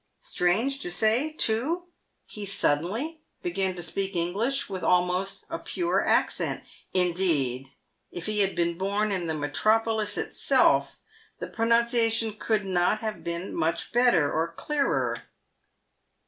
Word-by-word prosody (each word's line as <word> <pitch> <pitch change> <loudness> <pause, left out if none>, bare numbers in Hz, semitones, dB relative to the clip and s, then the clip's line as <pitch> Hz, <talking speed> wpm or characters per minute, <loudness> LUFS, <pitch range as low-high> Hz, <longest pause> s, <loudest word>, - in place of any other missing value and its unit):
Strange 255 - +1
to 175 - -5
say, 220 - +2
too, 300 +7 +1 0.4
he 210 - -8
suddenly 200 - 0 0.2
began 185 +1 -1
to 175 - -3
speak 195 +3 -2
English 200 +11 0
with 190 -2 -5
almost 180 +2 +1
a - - -5
pure 345 -1 -1
accent; - - +1 0.3
indeed, 165 -8 +1 0.4
if 175 -1 -7
he 215 -1 -1
had 195 -2 +2
been 170 0 0
born 200 +2 0
in 180 -3 -1
the 160 - -1
metropolis 215 +8 +1
itself, - - +2 0.4
the - - -5
pronunciation 230 -1 +2
could 215 -1 -1
not 185 +3 +1
have 215 -1 -4
been 170 +2 -4
much 165 +1 -1
better 240 - +3
or 160 +1 +1
clearer. 165 - -1
195 Hz, 130 wpm, -27 LUFS, 175-225 Hz, 0.4 s, better